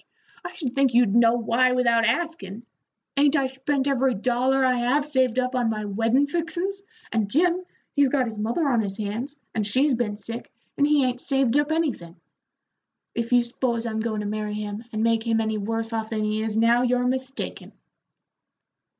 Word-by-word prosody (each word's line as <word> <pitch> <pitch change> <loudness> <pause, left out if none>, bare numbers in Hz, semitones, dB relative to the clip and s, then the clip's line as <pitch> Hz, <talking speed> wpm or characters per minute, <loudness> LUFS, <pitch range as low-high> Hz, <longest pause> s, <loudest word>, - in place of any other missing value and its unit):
I - - -7
should 260 -7 -4
think 270 -3 +2
you'd 240 -5 +4
know 235 0 +5
why 240 +2 +2
without 235 -2 +3
askin'. 235 - -3 0.5
Ain't 285 +1 +4
I 275 -2 +2
spent 265 +1 -1
every 265 -2 +2
dollar 255 +5 +1
I 255 -1 +2
have 255 +5 +1
saved 260 -5 +1
up 255 0 0
on 245 -3 +1
my 215 -1 -3
weddin' 225 +7 +2
fixin's, 345 +6 -3 0.3
and 220 -3 0
Jim, 350 - +2 0.3
he's 285 -2 +3
got 260 -1 +1
his 220 -3 -6
mother 235 +9 0
on 240 -4 +2
his 200 -1 -3
hands, 230 +8 -4
and 220 - 0
she's 265 +7 +2
been 225 -4 -1
sick, 230 +2 -7 0.2
and 285 - +3
he 295 -3 +3
ain't 250 0 -2
saved 270 -3 +1
up 295 +1 +2
anything. 270 - -2 1.0
If 235 0 -3
you 245 -1 +5
s'pose 235 -1 -2
I'm 220 -1 -2
goin' 220 -1 -2
to - - -5
marry 210 0 -3
him 210 +1 -5
and 215 0 -2
make 230 -1 +2
him 225 -1 0
any 220 -1 -1
worse 225 +2 -3
off 220 -1 -2
than 215 -1 -2
he 215 0 -1
is 220 -1 -2
now 230 +2 +4
you're 250 0 +1
mistaken." 260 +1 -4
240 Hz, 190 wpm, -24 LUFS, 220-270 Hz, 1.0 s, know